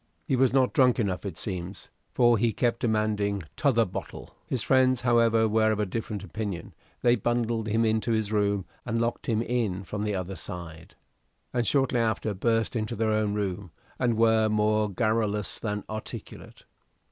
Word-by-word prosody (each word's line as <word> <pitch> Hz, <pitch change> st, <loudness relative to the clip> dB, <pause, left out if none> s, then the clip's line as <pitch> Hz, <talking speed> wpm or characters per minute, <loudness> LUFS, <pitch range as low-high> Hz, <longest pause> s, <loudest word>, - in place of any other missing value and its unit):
He 130 Hz, -, +1 dB
was 130 Hz, 0 st, +3 dB
not 130 Hz, -1 st, +2 dB
drunk 130 Hz, -5 st, +4 dB
enough, 100 Hz, -2 st, -1 dB
it 90 Hz, -4 st, -7 dB
seems, 95 Hz, -1 st, -5 dB, 0.2 s
for 120 Hz, -1 st, +4 dB
he 115 Hz, 0 st, +2 dB
kept 120 Hz, 0 st, 0 dB
demanding 105 Hz, -3 st, 0 dB
"t'other 125 Hz, -6 st, +3 dB
bottle." 90 Hz, -, -7 dB, 0.2 s
His 125 Hz, -4 st, -1 dB
friends, 130 Hz, -2 st, +3 dB
however, 115 Hz, -2 st, +3 dB
were 110 Hz, 0 st, +3 dB
of 105 Hz, -, -1 dB
a 105 Hz, -, +1 dB
different 105 Hz, 0 st, -4 dB
opinion; 100 Hz, -3 st, -5 dB, 0.3 s
they 120 Hz, 0 st, +5 dB
bundled 115 Hz, 0 st, -1 dB
him 110 Hz, +2 st, +2 dB
into 110 Hz, +1 st, 0 dB
his 110 Hz, -2 st, 0 dB
room 100 Hz, -2 st, +1 dB, 0.2 s
and 115 Hz, -, -2 dB
locked 115 Hz, +1 st, -2 dB
him 115 Hz, -1 st, +1 dB
in 110 Hz, -6 st, -1 dB
from 100 Hz, +3 st, -5 dB
the 105 Hz, -1 st, -1 dB
other 95 Hz, +1 st, -4 dB
side, 80 Hz, -3 st, -8 dB, 0.6 s
and 120 Hz, -3 st, 0 dB
shortly 135 Hz, -3 st, +2 dB
after 110 Hz, -2 st, 0 dB
burst 115 Hz, +4 st, 0 dB
into 110 Hz, -2 st, -2 dB
their 110 Hz, 0 st, 0 dB
own 110 Hz, -1 st, +1 dB
room, 100 Hz, -2 st, -3 dB, 0.3 s
and 120 Hz, -3 st, +1 dB
were 110 Hz, -1 st, +4 dB
more 105 Hz, 0 st, +2 dB
garrulous 105 Hz, 0 st, 0 dB
than 105 Hz, -2 st, -3 dB
articulate. 110 Hz, 0 st, -8 dB
110 Hz, 170 wpm, -27 LUFS, 100-115 Hz, 0.6 s, they